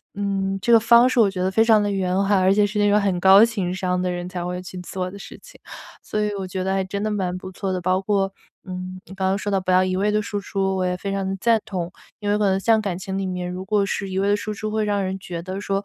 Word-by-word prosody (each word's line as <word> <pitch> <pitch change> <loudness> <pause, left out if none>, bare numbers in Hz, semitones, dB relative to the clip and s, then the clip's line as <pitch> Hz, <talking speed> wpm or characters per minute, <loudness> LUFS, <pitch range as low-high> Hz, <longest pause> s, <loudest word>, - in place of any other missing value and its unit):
嗯， 195 -1 -1
这 235 - +1
个 230 - +8
方 235 +2 +6
式 255 - +1
我 210 -4 +5
觉 185 -1 -4
得 185 +1 0
非 225 +3 +3
常 220 -2 +5
地 205 - 0
圆 185 -2 -1
滑， 200 0 +3
而 185 +1 +4
且 205 +1 +3
是 210 +1 -2
那 205 - +3
种 210 +1 +4
很 195 -3 0
高 195 +3 +7
情 200 -6 0
商 180 -1 -1
的 180 - -1
人 175 0 -4
才 175 -1 -4
会 180 0 -4
去 185 0 -9
做 180 0 -5
的 200 - -10
事 - - -10
情。 - - -16 0.4
所 215 - -3
以 210 0 0
我 190 -1 -4
觉 185 0 -4
得 190 0 0
真 200 +2 -4
的 215 - -1
蛮 185 -3 -2
不 185 0 -8
错 190 0 -3
的， 180 - -2
包 185 +1 +1
括， 195 -1 0 0.3
嗯， 185 0 -7
你 - - -12
刚 190 -1 -1
刚 195 +1 +1
说 205 0 -3
到 195 - +2
不 185 - -6
要 185 0 +5
一 185 0 -1
味 205 +2 +1
的 215 - +2
输 205 0 -4
出， 195 -1 -2
我 185 - 0
也 180 0 0
非 195 +2 -5
常 195 -1 -2
地 190 - -2
赞 230 -1 +4
同。 185 -5 -4 0.3
因 205 -1 -3
为 205 - +2
可 210 - +1
能 190 -1 +2
像 220 +3 +3
感 195 -4 -3
情 190 +1 -5
里 195 - -2
面， 180 -1 -3
如 185 +1 -6
果 205 0 +1
是 195 0 -3
一 190 - -4
味 200 +1 +1
地 205 - +4
输 215 +1 -4
出， 215 0 -5
会 215 0 0
让 205 -1 0
人 190 0 -3
觉 175 -2 -6
得 185 +2 -5
说， 195 0 -2
195 Hz, 330 characters per minute, -22 LUFS, 185-205 Hz, 0.4 s, 个